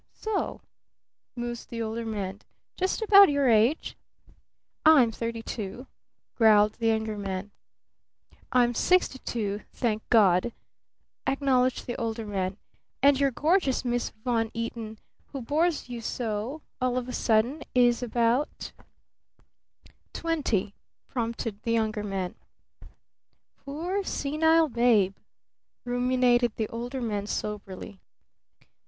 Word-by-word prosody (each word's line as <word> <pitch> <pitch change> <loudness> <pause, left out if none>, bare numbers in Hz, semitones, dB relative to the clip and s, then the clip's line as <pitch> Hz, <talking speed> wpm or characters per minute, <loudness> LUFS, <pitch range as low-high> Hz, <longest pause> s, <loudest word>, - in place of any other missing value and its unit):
"S - - -17
o?" 435 -2 -2 0.7
mused 240 -1 -5
the 230 - -5
Older 225 +1 -4
Man. 200 -2 -4 0.3
"Just 375 +4 -1
about 400 -3 +8
your 285 -2 +2
age?" 230 +6 +3 0.9
"I'm 285 -8 +6
thirty 230 0 -4
two," 220 +4 -6 0.5
growled 215 -2 +5
the 230 - +1
Younger 220 -1 0
Man. 195 0 -4 1.0
"I'm 245 -1 +3
sixty 360 0 +2
two, 210 -4 -3
thank 220 -3 -1
God!" 210 0 +4 0.7
acknowledged 260 -2 +1
the 240 - -4
Older 225 -1 -3
Man. 195 -2 -2 0.5
"And 280 -1 +5
your 280 -1 +3
gorgeous 295 0 +1
Miss 245 0 0
Von 225 0 -1
Eaton 230 -1 -5 0.4
who 275 - -4
bores 315 +5 0
you 240 -2 -6
so 230 +5 -3 0.2
all 255 0 +1
of 250 -1 -2
a 250 - -5
sudden 235 +8 +1
is 245 -1 +4
about 240 +3 0 0.7
?" - - -31
"Twenty," 280 - -1 0.4
prompted 230 -3 -3
the 230 - -1
Younger 220 -2 0
Man. 195 -3 -3 1.2
"Poor 340 +8 -3
senile 320 +1 +2
babe," 230 -6 +3 0.7
ruminated 245 -1 +2
the 220 - -2
Older 245 +3 -5
Man 205 -3 -2
soberly. 205 -2 -5
235 Hz, 115 wpm, -27 LUFS, 215-265 Hz, 1.2 s, about